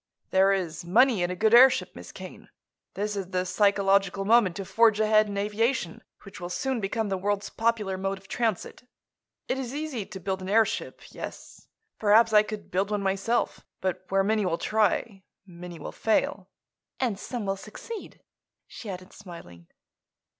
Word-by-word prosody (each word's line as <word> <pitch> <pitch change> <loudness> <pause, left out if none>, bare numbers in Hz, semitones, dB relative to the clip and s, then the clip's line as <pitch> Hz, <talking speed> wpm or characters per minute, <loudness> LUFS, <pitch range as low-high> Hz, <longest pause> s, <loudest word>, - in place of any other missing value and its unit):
"There 190 +1 +4
is 180 -5 -2
money 225 +4 +4
in 175 - 0
a 180 - -3
good 220 +4 +2
airship, 255 +2 +6
Miss - - -10
Kane. - - -11 0.5
This 210 +1 -2
is 195 -2 -4
the 185 -1 -1
psychological 195 0 +2
moment 215 -5 +4
to 195 - -5
forge 220 +1 +3
ahead 215 0 +4
in 200 -1 -5
aviation, 210 -1 -1 0.2
which 195 +1 -11
will 175 - -5
soon 260 +7 -2
become 210 +2 -2
the 190 -1 -1
world's 205 +1 -2
popular 220 -5 -1
mode 195 0 -2
of 195 0 -17
transit. 230 +2 -3 0.6
It 265 - -1
is 260 0 -5
easy 290 -9 -4
to 205 -2 -8
build 190 +1 -3
an 185 - -6
airship; 220 +2 0
yes. - - -9 0.3
Perhaps 220 +2 +5
I 210 - +8
could 215 -1 -7
build 195 +3 0
one 205 -1 -1
myself. 195 +5 -1 0.2
But 185 -1 -2
where 195 0 +2
many 215 +1 +1
will 170 -3 0
try, 215 -1 0 0.2
many 175 -2 -10
will - - -7
fail." 200 -3 0 0.5
"And 230 -7 -1
some 240 -2 -5
will 195 0 -1
succeed," 215 - -10 0.4
she 220 - -9
added, 185 0 -8
smiling. 125 - -12
200 Hz, 170 wpm, -27 LUFS, 190-220 Hz, 0.6 s, I